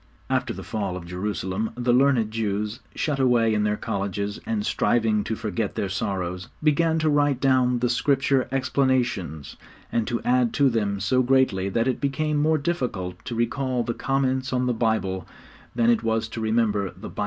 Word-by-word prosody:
After - - +1
the - - -7
fall 100 -4 -3
of 85 - -8
Jerusalem 95 +3 -3
the 120 0 +1
learned 125 -4 +3
Jews, 105 +1 -2 0.2
shut 145 -3 -1
away 120 -4 +3
in 105 - +1
their 105 0 +1
colleges 100 -1 -3
and 220 -2 -1
striving 110 - +1
to 110 - -2
forget 110 -1 -3
their 100 - -2
sorrows, 90 -1 -3 0.2
began 160 +2 +3
to 155 -1 +1
write 145 -3 +2
down 130 -2 +3
the 125 +1 +1
Scripture 135 0 +2
explanations, 130 - 0 0.3
and 115 -2 0
to 120 -2 -1
add 125 -1 +2
to 140 -2 +4
them 100 -3 -1
so 115 +7 +2
greatly 125 -7 +2
that 115 +5 0
it 130 - -1
became 150 +2 0
more 155 +2 +3
difficult 125 - -3
to 120 - -4
recall 125 +2 0
the 120 - -2
comments 130 0 0
on 125 -1 +1
the 125 - +1
Bible 110 -6 -1 0.5
than 120 -1 +4
it 115 -2 +2
was 110 -1 0
to 115 - -5
remember 110 -2 +1
the 95 - -6
Bible - - -8
itself. - - -11
115 Hz, 185 wpm, -24 LUFS, 105-130 Hz, 0.5 s, to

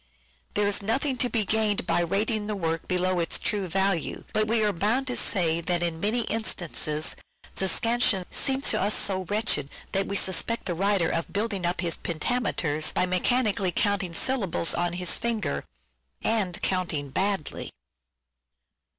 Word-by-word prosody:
There 205 0 +2
is 200 - +1
nothing 260 +7 0
to 245 - 0
be 220 -4 0
gained 215 -2 +1
by 175 - +1
rating 205 +4 0
the 210 - -2
work 165 -3 -2
below 180 0 +1
its 165 - +1
true 205 -4 -1
value, 190 -1 0
but 215 0 +1
we 225 0 +2
are 210 -1 +2
bound 220 +9 +1
to 250 -1 -1
say 170 -4 +2
that 175 0 0
in 165 -2 -2
many 215 +6 +1
instances 175 -8 -1 0.4
the 190 - 0
scansion 230 -3 +2
seems 270 0 +2
to - - 0
us 205 +2 +2
so 190 -2 +1
wretched 205 -7 0 0.2
that 195 0 0
we 200 - -2
suspect 200 +5 +1
the 180 - -1
writer 195 -1 +1
ot 165 - -2
building 200 -3 -1
up 175 0 -1
his 170 -2 -1
pentameters 165 -4 -1
by 180 - +3
mechanically 195 +1 +2
counting 195 -1 0
syllables 200 -8 0
on 175 0 0
his 180 0 0
fingers: 220 -11 -1 0.6
and 200 -6 +1
counting 160 -7 -1
badly. 195 -1 -1
195 Hz, 160 wpm, -26 LUFS, 175-215 Hz, 0.6 s, by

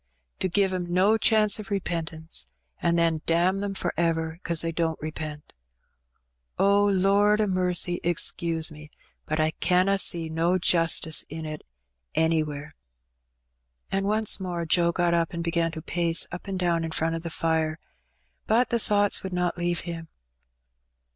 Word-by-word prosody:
to 185 - -1
give 195 +1 +2
^em 180 -1 -3
no 185 +5 +3
chance 215 -1 +3
o' - - -5
repentance, 165 - -3 0.3
an' 170 0 +2
then 165 -2 +1
damn 175 +4 +2
them 200 -1 -3
for 175 -2 -2
ever 165 -1 -1
'cause 170 -3 +2
they 165 - -1
don't 165 -1 -1
repent! 155 -1 -7 1.0
O 200 +1 +4
Lord 200 +2 +3
a 215 - +3
mercy, 180 -2 0
excuse 165 -1 0
me, 150 0 -12 0.4
but 155 +1 -1
I 155 0 +2
canna 185 +4 +1
see 170 -3 +1
no 165 +3 +1
justice 165 -2 +3
in 160 +1 -6
it 155 -1 -6 0.5
anywhere.'' 155 -2 0 1.2
And 195 0 0
once 215 -1 +2
more 175 -3 -3
Joe 170 +1 +3
got 175 0 +1
up 170 +1 0
and 170 0 -3
began 170 0 0
to 160 -2 -7
pace 170 -1 +1
up 175 +3 -8
and 195 -1 -3
down 170 -2 0
in 165 - -3
front 160 0 -1
of 165 - -3
the 170 - -5
fire; 160 -1 -1 0.7
but 235 +3 +3
the 235 - +2
thoughts 205 -2 +1
would 190 -1 -6
not 180 -1 0
leave 175 0 -1
him. 165 -1 -7
170 Hz, 160 wpm, -26 LUFS, 160-190 Hz, 1.2 s, O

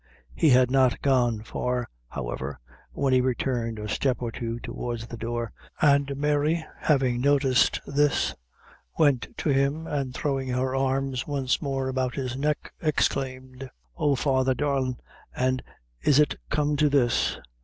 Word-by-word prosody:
He 160 - +3
had 125 -1 +5
not 130 -2 +3
gone 120 -5 +2
far, 125 +2 -2 0.2
however, 65 +3 -5 0.3
when 135 -2 0
he 130 - +5
returned 120 -2 -1
a 105 0 -5
step 130 +4 0
or 120 -2 -3
two 115 0 -4
towards 120 -1 -5
the 120 - -8
door; 115 -1 -3 0.3
and 140 -1 +3
Mary, 150 +3 +1
having 130 -5 +2
noticed 135 -2 +3
this, 145 +1 +1 0.6
went 140 -7 +3
to - - -1
him, 140 +3 +1
and 140 -4 -2
throwing 135 0 -2
her 130 +1 -1
arms 135 -1 0
once 135 -3 0
more 135 -3 -2
about 130 -1 -1
his 130 -2 -3
neck, 150 +2 -2
exclaimed: 130 -4 -1 0.3
"Oh! 145 -3 +2
Father, 130 -1 +1
darlin' 130 -2 0 0.4
an' 130 0 +1 0.4
is 140 - +4
it 150 -1 +4 0.2
come 150 0 +1
to 150 0 +4
this? 120 - +2
130 Hz, 145 wpm, -26 LUFS, 125-140 Hz, 0.6 s, had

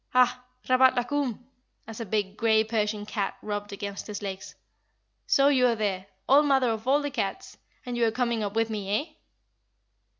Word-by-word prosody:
Ah! 250 0 +3 0.2
Rabat 255 0 +5
la 245 - +1
Koum," 250 -3 -2 0.4
as 225 0 -9
a 230 - -5
big, 205 -1 -1
grey 220 -1 +3
Persian 210 -2 -1
cat 205 -2 -3
rubbed 205 -1 -4
against 200 0 -6
his 210 -1 -6
legs, 195 -1 -6 0.7
"so 275 0 +4
you 260 -3 +4
are 235 - +2
there, 200 -3 -2 0.2
old 290 +2 +5
mother 265 -4 +3
of 220 +2 -5
all 285 +2 +3
the 290 - -3
cats; 275 - -4 0.3
and 245 -1 -4
you 240 - +1
are - - +1
coming 235 -1 -1
up 205 0 -4
with 225 0 +1
me, 205 -1 -1
eh?" 310 +1 -9
225 Hz, 190 wpm, -27 LUFS, 205-255 Hz, 0.7 s, Rabat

